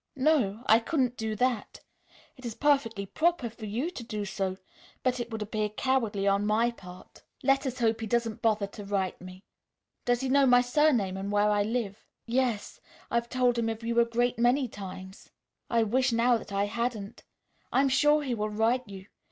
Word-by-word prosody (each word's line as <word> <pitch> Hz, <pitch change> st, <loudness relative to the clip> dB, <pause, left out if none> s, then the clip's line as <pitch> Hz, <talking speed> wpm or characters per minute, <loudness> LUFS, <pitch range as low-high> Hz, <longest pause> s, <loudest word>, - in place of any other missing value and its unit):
"No; 260 Hz, -7 st, +1 dB
I 220 Hz, -2 st, +6 dB
couldn't 250 Hz, 0 st, 0 dB
do 220 Hz, -2 st, -3 dB
that. 245 Hz, -1 st, -1 dB, 0.6 s
It 255 Hz, -, -16 dB
is 235 Hz, -3 st, -5 dB
perfectly 245 Hz, -9 st, +1 dB
proper 310 Hz, -, 0 dB
for 220 Hz, -1 st, -9 dB
you 245 Hz, -, -2 dB
to 360 Hz, -, -7 dB
do 215 Hz, -3 st, -4 dB
so, 190 Hz, -1 st, -3 dB, 0.5 s
but 255 Hz, -1 st, +1 dB
it 240 Hz, -1 st, -4 dB
would 220 Hz, -2 st, -4 dB
appear 210 Hz, 0 st, -2 dB
cowardly 215 Hz, -4 st, 0 dB
on 200 Hz, +1 st, +2 dB
my 220 Hz, +3 st, +2 dB
part. 180 Hz, -5 st, -13 dB, 0.2 s
Let 270 Hz, +1 st, +2 dB
us 255 Hz, -1 st, -4 dB
hope 225 Hz, -2 st, +1 dB
he 225 Hz, -, -3 dB
doesn't 230 Hz, 0 st, -1 dB
bother 215 Hz, -2 st, +2 dB
to 200 Hz, +1 st, -10 dB
write 195 Hz, -3 st, -2 dB
me. 185 Hz, +1 st, -11 dB, 0.6 s
Does 245 Hz, 0 st, +1 dB
he 265 Hz, -, -1 dB
know 275 Hz, 0 st, +4 dB
my 245 Hz, 0 st, +6 dB
surname 245 Hz, -7 st, +2 dB
and 195 Hz, +1 st, -4 dB
where 205 Hz, 0 st, +3 dB
I 205 Hz, 0 st, +2 dB
live?" 215 Hz, -2 st, -2 dB, 0.2 s
"Yes; 240 Hz, -3 st, -1 dB, 0.3 s
I've 235 Hz, 0 st, 0 dB
told 250 Hz, -2 st, +2 dB
him 225 Hz, -1 st, 0 dB
of 225 Hz, 0 st, -5 dB
you 235 Hz, 0 st, +1 dB
a 235 Hz, -, +5 dB
great 240 Hz, +1 st, 0 dB
many 250 Hz, +3 st, +3 dB
times. 190 Hz, -2 st, -9 dB, 0.4 s
I 230 Hz, -1 st, +3 dB
wish 255 Hz, +4 st, +1 dB
now 235 Hz, +1 st, +3 dB
that 225 Hz, -, -6 dB
I 200 Hz, 0 st, +1 dB
hadn't. 230 Hz, -1 st, -4 dB, 0.5 s
I -, -, +3 dB
am 275 Hz, -, +2 dB
sure 295 Hz, +3 st, +4 dB
he 260 Hz, -3 st, -2 dB
will 215 Hz, -2 st, -2 dB
write 225 Hz, +4 st, +1 dB
you. 190 Hz, -1 st, -9 dB
230 Hz, 195 wpm, -28 LUFS, 205-250 Hz, 0.6 s, I